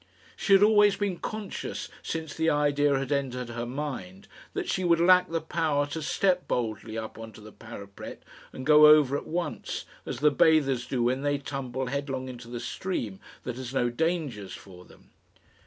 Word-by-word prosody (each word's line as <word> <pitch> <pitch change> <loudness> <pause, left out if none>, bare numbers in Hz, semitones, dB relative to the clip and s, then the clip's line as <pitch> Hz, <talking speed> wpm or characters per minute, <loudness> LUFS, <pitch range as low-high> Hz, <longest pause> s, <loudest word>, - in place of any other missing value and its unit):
She 200 - +2
had 195 +1 +7
always 210 -1 +6
been 200 -3 -2
conscious, 215 -3 -5
since 160 -2 -4
the 160 0 +1
idea 145 -1 +2
had 135 +1 -3
entered 125 -3 -1
her 120 0 -4
mind, 120 -9 -5 0.3
that - - -2
she 185 - -1
would 170 -2 +4
lack 180 +1 +5
the 165 0 -1
power 155 -3 0
to 160 +2 -4
step 180 +3 +1
boldly 110 -2 -2
up 110 0 -6
on 115 0 -8
to 100 - -13
the 105 0 -12
parapet 100 -4 -10 0.3
and 130 - -8
go 150 0 +8
over 150 -3 +6
at - - -4
once, 170 +2 -3 0.2
as - - -3
the 150 +4 +4
bathers 135 -5 +3
do 125 -3 0
when 130 +3 +1
they 145 0 +1
tumble 135 -2 -4
headlong 135 0 -3
into 125 -2 -9
the 120 0 -5
stream 115 - -4 0.2
that 125 -1 -5
has 130 0 -6
no 120 -2 +2
dangers 145 - -2
for 90 -2 -13
them. - - -20
140 Hz, 185 wpm, -28 LUFS, 120-160 Hz, 0.3 s, go